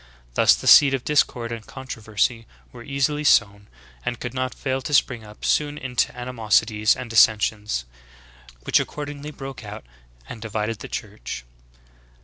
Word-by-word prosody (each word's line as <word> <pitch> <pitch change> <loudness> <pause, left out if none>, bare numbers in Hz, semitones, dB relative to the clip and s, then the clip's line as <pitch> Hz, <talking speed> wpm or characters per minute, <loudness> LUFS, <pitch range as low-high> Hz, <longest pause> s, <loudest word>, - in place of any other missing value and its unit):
Thus - - +5
the - - -9
seeds 135 -2 +8
of 130 - -5
discord 125 -5 +1
and 115 -2 -6
controversy 115 -3 -3 0.2
were 120 - -12
eas 140 +1 +1
ily 150 0 -4
sown, 100 -7 +3 0.4
and 120 - -3
could 120 0 -5
not 130 -1 -3
fail 130 -1 -2
to 145 +3 -1
spring 120 -4 +2
up 105 0 -11
soon 150 -1 +1
into 130 -3 -1
animos 120 -3 +2
ities 105 -1 +1
and 125 - -6
dissensions, 105 - +2 0.8
which - - +3
accordingly 145 0 -5
broke 135 -3 -8
out - - -9 0.4
and 115 - -9
divid 110 -1 -3
ed 115 - -5
the - - -8
Church.'" - - -6
120 Hz, 160 wpm, -23 LUFS, 110-135 Hz, 0.8 s, seeds